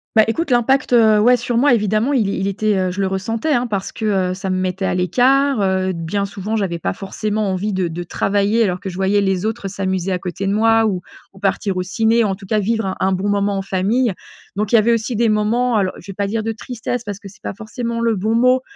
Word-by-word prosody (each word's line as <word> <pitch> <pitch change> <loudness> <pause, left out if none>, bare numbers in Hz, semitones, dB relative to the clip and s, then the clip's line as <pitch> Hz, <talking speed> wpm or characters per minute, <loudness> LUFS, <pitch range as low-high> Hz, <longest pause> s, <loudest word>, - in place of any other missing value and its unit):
Bah, 220 - +7
écoute, 305 +8 -1
l'impact, 255 +2 +2
heu, 220 -3 +5
ouais, 245 +4 +5
sur 240 0 -3
moi 280 +4 +4
évidemment 215 +5 +1
il 230 -7 +2
il 195 0 -1
était, 210 +1 0
heu 185 -1 0
je 185 - -6
le 195 - +2
ressentais, 220 +9 -1
hein, 245 -2 +1
parce 200 -4 -3
que, 220 - -5 0.3
heu, - - -2
ça 190 +1 -5
me 185 - 0
mettait 185 +1 -2
à - - 0
l'écart, 255 - +2
heu, 190 -1 +1
bien 170 +4 -2
souvent 200 +2 -4
j'avais 190 -6 -1
pas - - -2
forcément 210 +1 -2
envie 195 +3 -2
de 185 -2 0
de 165 +1 -5
travailler 205 +5 +1
alors 185 -4 -1
que 190 - -5
je 180 - -8
voyais 195 +2 +2
les 195 -1 0
autres 220 -2 -3
s'amuser 190 -1 -2
à 185 - +1
côté 180 +2 -4
de - - +1
moi, 225 +1 +4
ou 185 -4 -2 0.3
ou - - -18
partir 195 -1 -1
au 180 - 0
ciné 225 +5 +2
en 200 -3 0
tout 195 0 -10
cas 215 - +1
vivre 220 0 0
un 190 - -3
un 190 - +1
bon 190 +2 -1
moment 200 0 +1
en - - -1
famille. 200 +6 0 0.4
Donc 210 0 -2
il - - +5
y - - +6
avait 230 +2 +3
aussi 230 +2 -1
des 230 +1 +2
moments, 225 +3 +1
alors 195 -3 +1
je 200 - -9
vais - - -11
pas 200 - -1
dire 220 +3 -1
de 225 +1 -2
tristesse 240 +1 -5
parce 205 -3 -6
que 200 - -11
c'est 195 - -19
pas - - -4
forcément 230 +3 -4
le 230 -1 +2
bon 215 +3 -1
mot 255 +2 +4
205 Hz, 260 wpm, -19 LUFS, 190-225 Hz, 0.4 s, Bah